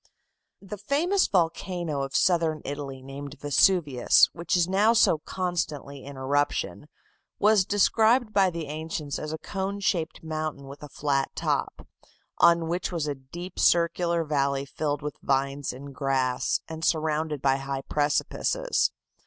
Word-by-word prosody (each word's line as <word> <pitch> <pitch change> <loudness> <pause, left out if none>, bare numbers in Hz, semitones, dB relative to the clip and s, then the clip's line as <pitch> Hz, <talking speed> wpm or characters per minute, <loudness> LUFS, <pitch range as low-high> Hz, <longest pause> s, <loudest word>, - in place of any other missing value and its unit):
The 200 +1 -8
famous 325 - +1
volcano 170 -4 -1
of 135 +1 -4
southern 165 -4 +2
Italy 140 -2 -6
named 140 +1 -8
Vesuvius, 145 -3 +4
which 170 +2 -1
is 175 -1 +2
now 205 +4 +3
so 215 -8 +4
constantly 155 -6 -4
in 140 0 -9
eruption, 145 +2 -1 0.5
was 210 -2 +4
described 220 +3 +3
by 195 -2 +4
the 165 -2 -5
ancients 155 -1 -4
as 155 - -5
a 160 - -3
cone 195 +3 -4
shaped 170 -5 -1
mountain 155 -3 -4
with 140 +1 -11
a 150 - -9
flat 140 -2 0
top, - - -2 0.5
on 170 -1 +5
which 175 +2 -2
was 165 -4 -2
a 145 - -1
deep 170 +7 -9
circular 170 0 +2
valley 140 -2 0
filled 145 +1 -3
with 150 -1 -5
vines 140 +1 0
and 140 +2 -10
grass, 130 -2 0
and 160 0 -7
surrounded 155 -2 0
by 135 0 +2
high 135 0 -4
precipices. 155 - 0
155 Hz, 145 wpm, -26 LUFS, 140-180 Hz, 0.5 s, on